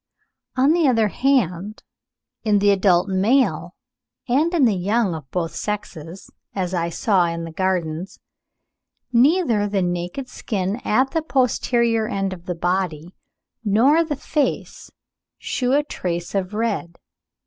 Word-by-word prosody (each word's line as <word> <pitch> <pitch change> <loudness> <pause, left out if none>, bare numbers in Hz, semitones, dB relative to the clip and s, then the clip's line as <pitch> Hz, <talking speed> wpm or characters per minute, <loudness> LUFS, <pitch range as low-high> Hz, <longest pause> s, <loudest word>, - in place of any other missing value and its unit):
On 270 +3 +4
the 335 -2 +3
other 225 -4 +3
hand, 210 -7 0 0.6
in 210 -2 +3
the 205 0 +4
adult 190 -2 +3
male 210 +8 +1 0.5
and 290 +7 +2
in 330 -7 +3
the 225 - +3
young 200 +2 0
of 155 -4 -8
both 170 -2 -3
sexes 185 -4 -6 0.2
(as 185 -2 -2
I 170 -1 0
saw 185 +1 +2
in 170 0 -4
the 165 - -7
Gardens), 180 -1 -2 1.0
neither 245 - +3
the 200 -2 0
naked 175 +9 -3
skin 200 -4 -3
at 260 +5 +2
the 325 - 0
posterior 235 -5 +1
end 195 -4 -2
of 175 -1 -12
the 180 - -2
body, 175 -1 -2 0.5
nor 250 +10 +4
the 310 -2 -3
face, 290 +1 -2 0.5
shew 250 0 -1
a 290 +1 +3
trace 175 - -4
of 195 0 -2
red. 210 -6 -2
205 Hz, 135 wpm, -22 LUFS, 180-250 Hz, 1.0 s, On